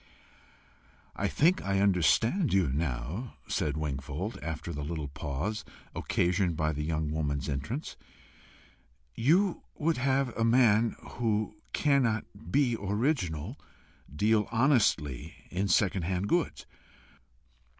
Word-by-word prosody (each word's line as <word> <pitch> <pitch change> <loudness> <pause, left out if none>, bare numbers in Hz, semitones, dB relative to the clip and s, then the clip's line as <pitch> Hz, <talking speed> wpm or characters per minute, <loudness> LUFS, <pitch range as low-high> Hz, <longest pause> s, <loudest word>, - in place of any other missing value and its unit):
"I - - 0
think 175 +5 +3
I 100 0 +1
understand 100 - +3
you 95 -7 +3
now," 75 - -3
said 75 0 -1
Wingfold, 75 - -4
after 80 +2 -4
the 75 -1 -4
little 75 -1 -4
pause 75 +10 -3 0.3
occasioned 90 -2 +1
by 80 -1 +1
the 75 - -3
young 75 -1 -1
woman's 70 -3 -1
entrance. 75 - -4 1.2
"You 170 - +2
would 160 +1 0
have 135 -1 +1
a 115 - 0
man 115 -1 +4 0.2
who 110 -2 0 0.2
cannot 130 -7 +2 0.3
be 125 0 +3
original, 105 - -1 0.5
deal 105 +7 +2
honestly 115 - +2 0.2
in 95 +3 0
second 95 -1 +2
hand 90 +3 -1
goods. 170 +4 0
100 Hz, 110 wpm, -30 LUFS, 75-120 Hz, 1.2 s, man